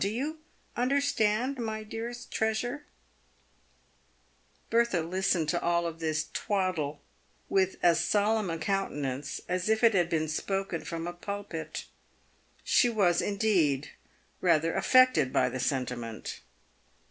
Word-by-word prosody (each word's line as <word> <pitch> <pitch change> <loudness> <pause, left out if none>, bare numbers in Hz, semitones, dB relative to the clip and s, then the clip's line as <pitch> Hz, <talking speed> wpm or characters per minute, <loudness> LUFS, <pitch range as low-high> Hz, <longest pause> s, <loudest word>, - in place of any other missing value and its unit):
Ho 195 - +2
you 280 +9 -3 0.4
understand, 255 -1 +1
my 220 -2 -3
dearest 230 +3 -6
treasure 240 +6 -1 0.8
?" 60 0 -38
Bertha 230 -7 +2
listened 180 -1 0
to 175 - 0
all 170 -1 +1
this 155 -1 -1
twaddle 180 -8 -1 0.5
with 190 -1 +2
as 170 -1 +4
solemn 210 -1 +1
a 165 - -2
countenance 150 -7 -2
as 180 +2 -1
if 220 +1 +2
it 230 -1 +6
had 175 -3 +2
been 155 -2 0
spoken 195 +2 -2
from 165 -1 -4
a 175 - -4
pulpit. 175 -4 -6 0.8
She 245 - +4
was, 190 -7 +2
indeed, 180 -10 +1 0.5
rather 165 -2 +3
affected 255 - +4
by 125 - +2
the 130 - -5
sentiment. 125 -4 -3
180 Hz, 125 wpm, -29 LUFS, 155-220 Hz, 0.8 s, it